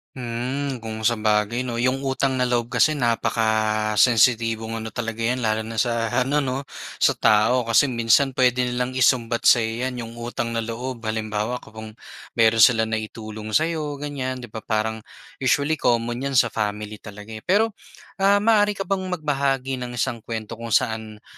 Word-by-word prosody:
Hmm, 125 +1 -4
kung 110 0 -2
sabagay 110 +1 +1
'no? 120 -2 -4
Yung 130 +3 0
utang 135 0 0
na 125 - +1
loob 120 -2 0
kasi 125 +6 +3
napakasensitibong 110 0 +2
ano 110 - -6
talaga 115 0 -4
'yan 125 +3 0
lalo 110 -2 0
na 110 0 -4
sa 115 -2 0
ano 140 +3 +1
'no 135 +1 -3 0.3
sa - - +3
tao 110 +4 +3
kasi 115 +5 +3
minsan 125 +2 +2
puwede 125 -1 +2
nilang 125 +1 -2
isumbat 120 -2 +2
sa'yo 115 +2 +3
'yan, 125 -2 -5
yung 115 +1 -10
utang 120 0 -3
na 115 - -1
loob. 115 +2 -5
Halimbawa 110 +2 -2
kung 110 0 -11 0.4
mayro'n 115 -1 +4
sila 115 0 +6
naitulong 110 -1 -5
sa 155 - +5
'yo 155 -3 -3
ganyan 140 -3 -4
'di 120 - -10
ba 110 - -5
parang 110 +1 -2 0.4
usually 140 +4 +1
common 120 0 +1
'yan 140 - -3
sa - - +4
family 105 -1 -3
talaga, 105 +1 -11
eh. 110 - -6
Pero, 215 +4 +3 0.5
ah, 200 +1 +4
maaari 210 -2 +3
ka 195 - -3
bang 195 -1 -2
magbahagi 135 -4 -1
ng 120 -1 -6
isang 120 0 -1
kuwento 110 0 -6
kung 115 -1 -1
saan 110 -1 -1
120 Hz, 170 wpm, -23 LUFS, 110-130 Hz, 0.5 s, sila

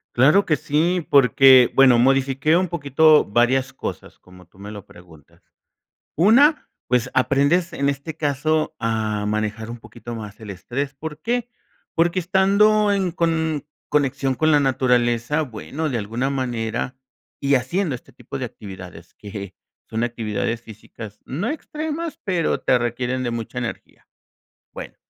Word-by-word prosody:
Claro 150 +11 +5
que 155 - +1
sí, 165 +5 0
porque, 130 -2 +6
bueno, 130 -3 +6
modifiqué 135 +5 +2
un 185 +1 +1
poquito 155 -1 +4
varias 125 +5 +1
cosas, - - -7
como 90 0 -17
tú 90 +3 -24
me 100 +1 -8
lo 105 -3 -9
preguntas. 80 -4 -18 0.7
Una, 260 - +4 0.2
pues, 125 -2 +1
aprendes 140 +7 +2
en 140 0 -1
este 140 +3 -4
caso 155 +2 0
a 110 -2 -1
manejar 110 +1 -2
un 120 - -7
poquito 120 +1 -10
más 105 -2 -8
el 110 -2 -8
estrés, 130 +9 -4
¿por 150 +2 -8
qué? 240 0 -1 0.5
Porque 170 +2 +2
estando 200 +3 +3
en 190 -3 0
con 160 -3 -1 0.2
conexión 135 -2 0
con 155 +4 +1
la 150 -1 +5
naturaleza, 125 0 +1
bueno, 145 +4 -4
de 130 - -2
alguna 115 +5 -2
manera, 130 -1 -3 0.4
y 140 0 +2
haciendo 145 +6 0
este 125 - -11
tipo - - -8
de - - -3
actividades 90 -4 -10
que 100 -2 -8 0.3
son 115 +1 -1
actividades 115 -1 -3
físicas, 110 -1 -11
no 175 - -3
extremas, 310 +2 -5
pero 180 -5 0
te - - +3
requieren 125 +2 -2
de 120 - -2
mucha 115 -1 -6
energía. - - -6 0.7
Bueno, - - -9
135 Hz, 145 wpm, -22 LUFS, 115-160 Hz, 0.7 s, porque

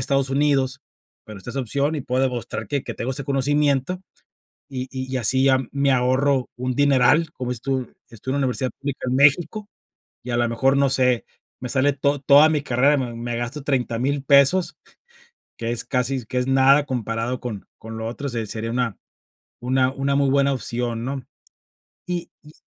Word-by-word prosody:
Estados 135 0 +1
Unidos, 135 -1 +1 0.4
pero 105 -2 -10
está 95 - -8
esa 135 - -2
opción 140 +5 -1
y 150 - -2
puedo 130 0 -1
demostrar 120 -4 -3
que 140 +4 -2
que - - -6
tengo 130 +3 -3
ese 135 0 -5
conocimiento 145 +4 +1 0.7
y 130 -1 -5
y 130 0 -3
así 130 +3 +2
ya 130 -1 +4
me 140 0 +1
ahorro 130 +1 +2
un 125 0 -2
dineral. 145 +3 +3
Como 125 -1 -4
dices 120 -2 -5
tu, 130 -2 -2 0.2
estudio 120 +4 -5
en 140 - 0
la 135 - +2
universidad 130 0 -2
pública 140 -1 -4
en 125 - 0
México 155 +9 +3 0.6
y, 125 - -7
a 120 - 0
la 120 -1 +2
mejor, 135 +4 +2
no 140 0 +3
sé, 125 -2 +2 0.3
me 125 - -5
sale 135 +3 +2
to 140 +1 0
toda 145 +2 +6
mi 150 -2 0
carrera, 135 +3 +3
me 125 -4 -3
me 120 0 -4
gasto 120 +5 -4
30,000 135 +1 -1
pesos, 140 +7 +4 0.9
que 115 0 -2
es 120 - -2
casi 125 0 -1
que 125 +3 -2
es 125 - -1
nada 135 +2 +5
comparado 120 0 -2
con 110 -5 -6
con 110 0 -9
lo 110 - -3
otro, 140 +5 -5
se 115 -3 -3
sería 115 +2 -4
una 120 -3 -1 0.6
una 130 +1 +1
una 140 0 -1
muy 140 -1 +2
buena 140 0 +3
opción, 120 -2 -3
¿no? 135 +1 -4 0.8
Y 175 -1 -4
y 150 0 -16
130 Hz, 190 wpm, -22 LUFS, 125-140 Hz, 0.9 s, toda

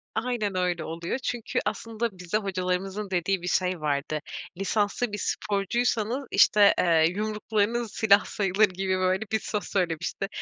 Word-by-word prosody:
Aynen 220 -5 -1
öyle 180 -3 0
oluyor. 170 +8 -3
Çünkü 240 -3 -2
aslında 230 +1 -2
bize 180 +4 -1
hocalarımızın 190 +1 -2
dediği 185 +1 0
bir 180 - -5
şey 180 -3 0
vardı: 150 +1 -1 0.4
"Lisanslı 205 +4 0
bir 205 - -3
sporcuysanız" 220 +5 -1
işte, 205 -2 +6
eee, 165 -2 +4
"yumruklarınız 215 +2 -1
silah 205 -2 +4
sayılır." 200 +1 +2
gibi, 190 0 -1
böyle 185 +2 +1
bir 220 - +2
söz 210 -1 -3
söylemişti. 175 0 -2
195 Hz, 140 wpm, -26 LUFS, 180-215 Hz, 0.4 s, işte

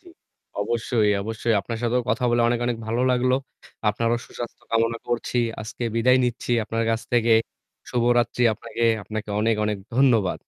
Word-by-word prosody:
জি। 360 - -27 0.5
অবশ্যই, 115 -2 +1
অবশ্যই। 110 +2 -1
আপনার 115 +3 -5
সাথেও 120 +1 +1
কথা 125 - 0
বলে 120 0 +3
অনেক, 120 0 +1
অনেক 120 -1 0
ভালো 115 +2 -1
লাগলো। 125 0 +2 0.5
আপনারও 115 +3 +1
সুস্বাস্থ্য 120 -1 -8
কামনা 115 0 +1
করছি। 120 +1 -1 0.2
আজকে 110 +3 -7
বিদায় 125 +3 +4
নিচ্ছি 120 0 -3
আপনার 115 +1 -1
কাছ 115 0 0
থেকে। 120 -1 +3 0.6
শুভরাত্রি 120 0 +2
আপনাকে। 115 +1 -4 0.2
আপনাকে 105 +1 -5
অনেক, 115 +1 +2
অনেক 105 -1 -1 0.2
ধন্যবাদ। 120 -8 +3
115 Hz, 155 wpm, -24 LUFS, 110-120 Hz, 0.6 s, বিদায়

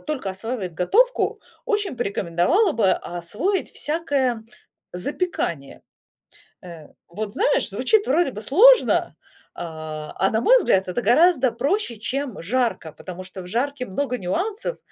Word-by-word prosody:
только 275 -10 -3
осваивает 190 -2 -5
готовку, 475 - +2 0.2
очень 415 - -1
порекомендовала 200 - +1
бы 210 -5 +2
освоить 205 - -3
всякое, 290 -5 0
м, 220 -1 -12 0.5
запекание. 180 - -3 0.8
Э, 165 -4 -11 0.2
вот 205 +4 -5
знаешь, 445 +7 +1
звучит 435 -2 +1
вроде 305 +2 +2
бы 210 - -8
сложно, 445 - +5 0.4
а 155 -2 -7
а 195 - +2
на 220 - +1
мой - - +6
взгляд, 190 - +2
это 185 +7 -2
гораздо 260 - +4
проще, 270 - -1
чем 255 -1 -4
жарка, 230 -4 -1
потому 185 0 -9
что 185 0 -9
в - - -10
жарке 255 +6 -2
много 250 +5 -2
нюансов: 410 - -2
240 Hz, 135 wpm, -22 LUFS, -, 0.8 s, мой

